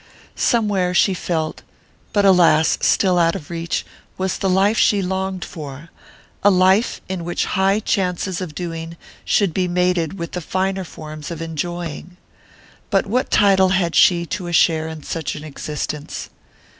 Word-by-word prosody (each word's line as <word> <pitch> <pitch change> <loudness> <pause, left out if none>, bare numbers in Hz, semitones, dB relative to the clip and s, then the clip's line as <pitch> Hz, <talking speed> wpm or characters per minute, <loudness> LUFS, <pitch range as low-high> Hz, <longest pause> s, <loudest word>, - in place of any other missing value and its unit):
Somewhere, 200 -6 +1
she 195 - +4
felt 160 -3 -3 0.5
but, 205 -1 +2
alas! 170 -4 +4
still 185 -3 +3
out 165 -1 +3
of 150 - -8
reach 165 0 -3 0.3
was 190 0 -2
the 195 - 0
life 195 +4 +3
she 205 - +4
longed 190 0 -2
for, 150 +1 -9 0.5
a 205 - +7
life 190 +3 +3
in 185 -2 -4
which 175 +1 -1
high 195 +2 +2
chances 185 -3 -1
of 165 -5 -6
doing 165 -1 -5 0.3
should 195 -6 +1
be 185 +1 0
mated 180 -1 0
with 170 -2 -5
the 180 - -4
finer 190 +3 -1
forms 155 -2 -9
of 170 -2 -6
enjoying. 170 +1 -5 0.7
But 195 -2 +2
what 245 +6 0
title 190 -2 +4
had 180 -2 +1
she 170 -2 +4
to 180 +1 -4
a 175 - -4
share 160 -1 +3
in 160 -2 -8
such 160 -3 -4
an 150 - -8
existence? 150 0 -5
180 Hz, 155 wpm, -20 LUFS, 165-190 Hz, 0.7 s, a